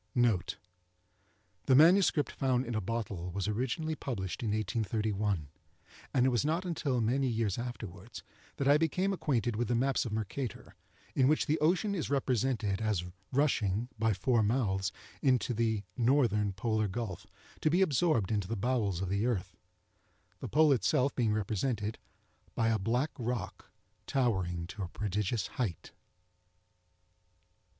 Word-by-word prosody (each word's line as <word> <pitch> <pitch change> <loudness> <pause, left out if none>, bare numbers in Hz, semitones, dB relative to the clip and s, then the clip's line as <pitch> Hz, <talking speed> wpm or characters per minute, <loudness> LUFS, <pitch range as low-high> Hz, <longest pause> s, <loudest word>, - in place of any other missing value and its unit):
NOTE.—The 90 -1 -3
"MS. 175 +7 +7 0.3
Found 130 -2 +1
in 120 - -4
a 110 - 0
Bottle," 100 -4 -3
was 100 +2 -3
originally 130 +9 -1
published 100 - -4
in 115 - -1
1831, 105 - -1 0.6
and 125 -2 +3
it - - +5
was 120 -1 +1
not 165 +5 0
until 150 -7 -1
many 130 +5 +1
years 115 -4 0
afterwards 110 -6 -7 0.3
that 140 - 0
I 145 +1 +6
became 180 +5 +1
acquainted 120 - 0
with 120 +2 -1
the 120 - +1
maps 135 +3 +1
of 115 - -5
Mercator, 110 +2 -4 0.4
in 130 - +3
which 155 +2 +3
the 155 +2 +1
ocean 185 +6 +2
is 175 -6 -2
represented 125 -6 0
as 105 -5 0 0.3
rushing, 120 -6 +1
by 110 0 +3
four 115 +4 +2
mouths, 100 -5 +1 0.3
into 130 -2 +2
the 110 -2 0
(northern) 115 -5 +2
Polar 110 +1 0
Gulf, 100 -3 -5 0.3
to 155 - +2
be 180 +5 +4
absorbed 150 - +2
into 100 -4 0
the 115 +2 -3
bowels 105 -5 0
of 95 - -3
the 100 +4 +1
earth; 100 -6 -2 0.8
the - - -5
Pole 155 +2 +4
itself 135 +1 +2
being 115 -4 +1
represented 105 +1 -1 0.6
by 115 0 +2
a 110 -1 +1
black 120 +9 0
rock, 120 -5 -4 0.4
towering 95 -10 0
to 100 +4 -8
a 95 - -2
prodigious 105 +2 -2
height. 105 -10 -4
115 Hz, 145 wpm, -31 LUFS, 100-130 Hz, 0.8 s, MS